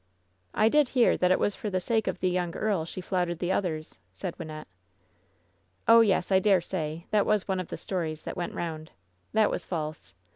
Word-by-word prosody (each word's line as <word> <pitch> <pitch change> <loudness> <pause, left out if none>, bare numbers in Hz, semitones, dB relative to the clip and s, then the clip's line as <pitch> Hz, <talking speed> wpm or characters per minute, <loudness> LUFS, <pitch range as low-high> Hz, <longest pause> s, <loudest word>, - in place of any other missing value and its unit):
"I 215 - +4
did 295 +2 +4
hear 240 - +5
that 180 - +2
it 185 - +4
was 205 - 0
for 210 - -4
the 185 -2 0
sake 220 +4 0
of - - -2
the 185 - +2
young 180 -2 -1
earl 200 -7 0
she 185 - -6
flouted 180 -2 -1
the 175 +2 -1
others," 155 - -2
said 170 - -5
Wynnette. 155 -1 -7 1.2
"Oh, 230 0 +8
yes, 195 -4 +2
I 190 - +6
dare 195 0 +4
say 165 -1 -4
— - - -31
^that 210 -1 +5
was 210 -2 +1
one 190 -1 0
of 185 - -4
the - - -6
stories 160 -5 -3
that - - -5
went 175 - -4
round! 160 -2 -4 0.4
That 220 -1 +4
was - - -2
false. 155 - -5
185 Hz, 215 wpm, -28 LUFS, 165-205 Hz, 1.2 s, Oh